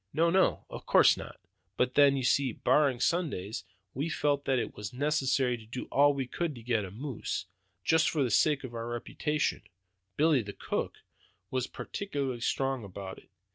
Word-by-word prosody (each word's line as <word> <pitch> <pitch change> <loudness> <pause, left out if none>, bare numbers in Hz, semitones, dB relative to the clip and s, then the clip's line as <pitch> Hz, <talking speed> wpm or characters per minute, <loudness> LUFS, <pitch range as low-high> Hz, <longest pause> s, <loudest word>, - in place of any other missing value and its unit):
"No, 165 +2 +3
no, 190 +1 +2
of - - -9
course - - +6
not; - - -9 0.4
but 125 0 +1
then, 140 -1 +5
you 130 - -2
see, 130 +1 +2
barring 140 -1 +2
Sundays, 130 - -1 0.3
we 145 +6 -2
felt 145 -2 0
that 135 -1 +2
it 120 - -2
was 105 -1 -6
necessary 135 -2 +1
to 110 - -13
do 125 +3 -5
all 145 +1 +5
we 135 -1 -1
could 160 +3 -3
to 120 - -11
get 115 -3 +1
a - - -7
moose, 115 -3 -4 0.4
just 160 +1 +4
for 155 -5 +1
the 125 - -1
sake 150 +4 +3
of 125 -2 -7
our 115 0 -4
reputations. 145 +5 -2 0.5
Billy, 150 -3 +4
the 100 -2 -7
cook, - - -3 0.5
was 130 -1 -1
particularly 140 -11 -4
strong 135 0 0
about 95 -1 -8
it. - - -24
135 Hz, 180 wpm, -30 LUFS, 120-150 Hz, 0.5 s, course